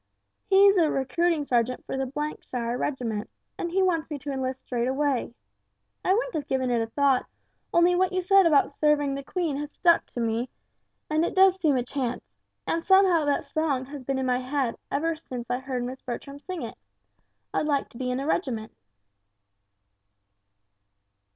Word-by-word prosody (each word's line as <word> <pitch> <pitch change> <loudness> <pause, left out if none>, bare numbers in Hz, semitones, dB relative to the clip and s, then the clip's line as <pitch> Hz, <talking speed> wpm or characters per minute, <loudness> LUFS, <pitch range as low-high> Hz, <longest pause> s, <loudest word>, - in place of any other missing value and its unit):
He's 395 0 +6
a 325 -3 +4
recruiting 310 +4 +1
sergeant 250 -2 0
for - - -4
the 280 +3 -3
shire 240 -1 -2
regiment, 240 -6 -3 0.3
and 345 - -3
he 380 +3 +2
wants 330 -4 0
me 300 - -4
to 285 +1 -6
enlist 260 -1 -3
straight 240 -1 -2
away. 265 -3 0 0.7
I - - +2
wouldn't 485 +5 +1
have 300 - -3
given 260 -2 0
it 235 -1 +2
a 225 - -2
thought 275 +1 +2 0.4
only 345 +1 +4
what 370 +1 +2
you 370 -1 -1
said 390 0 +6
about 295 -3 +4
serving 290 -1 +2
the 275 - -4
Queen 320 0 -2
has 295 0 -5
stuck 340 -1 +3
to - - -7
me, 230 +2 -1 0.6
and 310 +1 +1
it 345 - -2
does 380 0 +6
seem 295 -5 +3
a 245 - 0
chance, 250 -1 -3 0.4
and 330 0 -1
somehow 375 -4 +5
that 290 -1 0
song 295 -5 -1
has 280 0 -9
been 270 +1 -1
in 265 - -1
my 250 -1 +1
head 260 -2 -1
ever 325 +3 0
since 250 -6 -7
I 250 - 0
heard 260 -2 -3
Miss 255 +2 -6
Bertram 275 +3 -6
sing 365 -1 -6
it. 225 - -7 0.7
I'd 305 - 0
like 285 -2 +1
to 235 - -13
be 255 -1 -2
in 250 +1 -1
a 275 - -3
regiment." 250 -9 -1
280 Hz, 185 wpm, -26 LUFS, 255-330 Hz, 0.7 s, He's